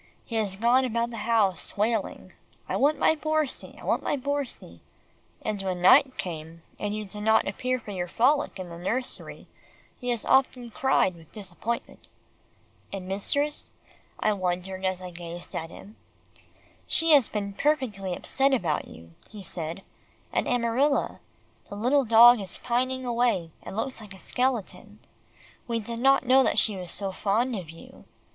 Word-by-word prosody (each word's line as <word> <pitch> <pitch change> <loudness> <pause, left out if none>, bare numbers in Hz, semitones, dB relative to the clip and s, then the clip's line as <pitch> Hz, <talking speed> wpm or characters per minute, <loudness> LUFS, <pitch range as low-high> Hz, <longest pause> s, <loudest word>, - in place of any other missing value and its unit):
"He 230 - -6
has 205 -3 0
gone 240 +5 +3
about 235 -1 -1
the 230 - -6
house 205 -6 +1
wailing, 215 0 -1 0.3
'I - - -2
want 295 +2 +3
my - - +4
Borsie 310 -2 -2
I - - -13
want - - +1
my - - 0
Borsie,' 285 0 -4 0.6
and 210 -2 -2
when 185 -2 -2
night 260 +7 +6
came, 165 -1 -6 0.2
and 205 0 -2
you 215 0 -4
did 210 +2 -6
not 220 +1 +3
appear 255 +6 -1
for 215 - -9
your 180 -2 -3
frolic 270 - +2
in 185 -2 -7
the 170 0 -9
nursery, 245 +8 -3 0.5
he 250 - -4
has 235 -3 -1
often 255 -3 +2
cried 265 -6 +2
with 165 -2 -17
disappointment." 210 +3 -5 0.8
"And 190 -2 -6
mistress," 285 +10 0 0.5
I 215 - +2
wondered 185 0 -3
as 185 -1 -1
I 180 - -7
gazed 175 0 -8
at 165 - -4
him. 210 +6 -13 0.9
"She 330 0 +2
has 280 -6 +6
been 200 -2 -3
perfectly 215 -9 0
upset 270 +7 +1
about 180 -9 -1
you," 85 +1 -13 0.2
he 205 -2 -10
said, 170 +1 -5 0.5
"and - - 0
Amarilla. 245 +4 +1 0.5
The - - -7
little 255 +6 +2
dog 235 +1 +8
is 190 - -4
pining 255 +1 -1
away, 235 -9 +1
and 195 - -8
looks 255 +1 -2
like 210 -2 -11
a - - -13
skeleton. 245 0 -2 0.7
We 230 -1 -1
did 230 +2 -5
not 270 +1 +4
know 260 +2 +6
that - - +1
she 215 - +2
was 180 -2 -6
so 195 +2 -3
fond 225 +6 0
of 180 -6 -6
you. 165 +1 -14
220 Hz, 165 wpm, -27 LUFS, 190-255 Hz, 0.9 s, dog